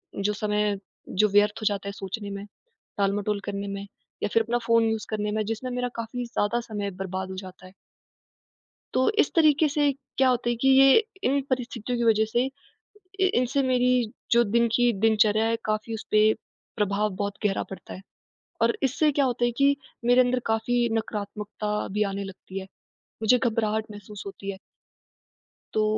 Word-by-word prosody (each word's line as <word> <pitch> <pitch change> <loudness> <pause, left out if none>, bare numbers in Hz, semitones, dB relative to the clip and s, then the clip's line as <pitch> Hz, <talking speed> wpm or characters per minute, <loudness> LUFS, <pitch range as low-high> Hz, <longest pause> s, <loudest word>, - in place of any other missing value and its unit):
जो 205 +1 0
समय 210 0 +1
है, 200 - -1 0.3
जो 210 +3 +3
व्यर्थ 205 +2 +3
हो - - -4
जाता 200 -1 0
है - - -2
सोचने 200 +2 -6
में, 200 0 -6 0.5
टालमटोल 200 +1 0
करने 200 0 -4
में, 200 0 -5 0.4
या - - +1
फिर 225 - +4
अपना 240 +2 0
फ़ोन 230 -1 +4
यूज़ 220 -1 -2
करने 210 -1 -2
में। 215 0 0
जिसमें 230 +4 -3
मेरा 250 0 -1
काफ़ी 230 +2 -4
ज़्यादा 235 0 0
समय 205 -4 -4
बर्बाद 190 0 -4
हो 190 - -6
जाता 185 -1 -10
है। 185 - -16 1.2
तो 260 - +3
इस - - +3
तरीके 310 -2 +5
से 290 0 +2 0.3
क्या 265 -1 +5
होता 240 -1 +1
है 240 - +1
कि 270 - +4
ये 270 0 +7 0.3
इन 280 +1 +3
परिस्थितियों 245 -2 -2
की 235 - +1
वजह 220 -1 +4
से, 240 +1 +3 0.8
इ 380 -1 +4
इनसे 255 +3 +2
मेरी 250 -3 +2 0.2
जो 235 0 +6
दिन 235 +2 +2
की 245 -1 +3
दिनचर्या 220 0 +4
है, 230 0 +1
काफ़ी 215 +1 -2
उसपे 215 0 +3 0.4
प्रभाव 210 0 +1
बहुत 200 0 -2
गहरा 195 - 0
पड़ता 195 - -8
है। - - -9 0.6
और 235 0 +3
इससे 290 +3 +2
क्या 280 0 +2
होता 245 -1 +1
है 240 - +1
कि 280 0 +4 0.3
मेरे 245 +1 +6
अंदर 250 0 +2
काफ़ी 235 +2 +1
नकारात्मकता 210 -1 -3
भी 210 - +2
आने 200 0 -3
लगती 195 0 -8
है। 190 - -7 0.6
मुझे 245 +3 +5
घबराहट 220 -3 0
महसूस 205 0 -9
होती 195 0 -6
है। 190 - -10 1.1
तो 215 0 +2
220 Hz, 180 wpm, -26 LUFS, 205-245 Hz, 1.2 s, ये